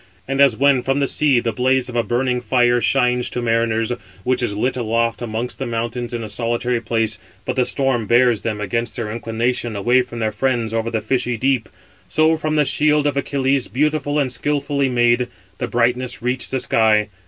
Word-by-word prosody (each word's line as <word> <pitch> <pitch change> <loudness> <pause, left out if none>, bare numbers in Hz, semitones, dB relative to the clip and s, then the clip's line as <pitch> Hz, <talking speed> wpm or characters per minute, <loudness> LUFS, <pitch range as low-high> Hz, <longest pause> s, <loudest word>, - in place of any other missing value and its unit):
639 135 - -3
And 135 - +1
as 135 -6 +5
when 140 -1 +4
from 135 +1 0
the 140 - +1
sea 140 -4 +2
the 120 -1 -1
blaze 130 0 +1
of 125 - -7
a 120 - +3
burning 125 +1 -1
fire 120 -1 +2
shines 125 -2 +1
to - - -4
mariners, 115 -1 0 0.3
which 125 0 +1
is 105 -4 -2
lit 125 +4 0
aloft 115 -1 -1
amongst 120 +1 -4
the 135 - -3
mountains 120 +1 -3
in 120 -1 -4
a - - -5
solitary 120 +2 -1
place; 115 -2 -1 0.3
but 130 - -2
the 125 -2 +2
storm 130 -6 0
bears 120 -2 +3
them 110 -2 -3
against 115 +3 -2
their 110 -3 -4
inclination 115 +1 -2
away 120 +6 +3
from 120 -1 -8
their 110 -1 -1
friends 115 0 -1
over 115 0 -1
the 110 -2 -2
fishy 120 +1 -1
deep; 130 -1 0 0.4
so 160 +1 +3
from 155 -1 -2
the 150 -1 +3
shield 150 +1 +2
of 145 -2 +1
Achilles, 140 -1 0
beautiful 150 +1 0
and 140 -3 +1
skilfully 140 +1 -1
made, 120 0 +2 0.3
the - - -2
brightness 125 +1 0
reached 125 +2 -2
the 130 - -1
sky. 110 -3 +2
120 Hz, 200 wpm, -20 LUFS, 115-135 Hz, 0.4 s, as